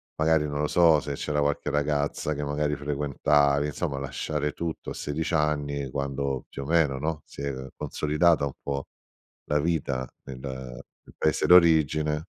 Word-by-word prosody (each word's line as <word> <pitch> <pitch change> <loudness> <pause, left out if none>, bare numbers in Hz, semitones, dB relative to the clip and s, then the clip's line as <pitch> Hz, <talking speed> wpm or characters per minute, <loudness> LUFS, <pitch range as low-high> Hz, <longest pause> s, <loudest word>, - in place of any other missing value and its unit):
magari 80 -1 +2
non 75 0 -2
lo 75 - +1
so, 85 -3 +5
se 70 - -4
c'era 75 +1 -2
qualche 70 0 0
ragazza 75 +1 0
che 75 0 -4
magari 75 +1 -1
frequentavi, 70 0 +2
insomma 75 -2 -3
lasciare 75 +2 -2
tutto 85 -2 -5
a - - -3
16 80 +4 -3
anni 70 -3 0
quando 70 -1 -2
più 70 - -6
o - - -8
meno, 80 -5 +3
no, 75 +1 -2
si - - -10
è 70 -1 -2 0.2
consolidata 75 0 +2
un 70 - -4
po' 70 -1 -3 0.6
la 75 - +1
vita 70 -5 -1 0.2
nel 65 -2 -8
nel 65 -2 -9
paese - - +1
d'origine. 80 -2 +5
75 Hz, 160 wpm, -27 LUFS, 70-75 Hz, 0.6 s, so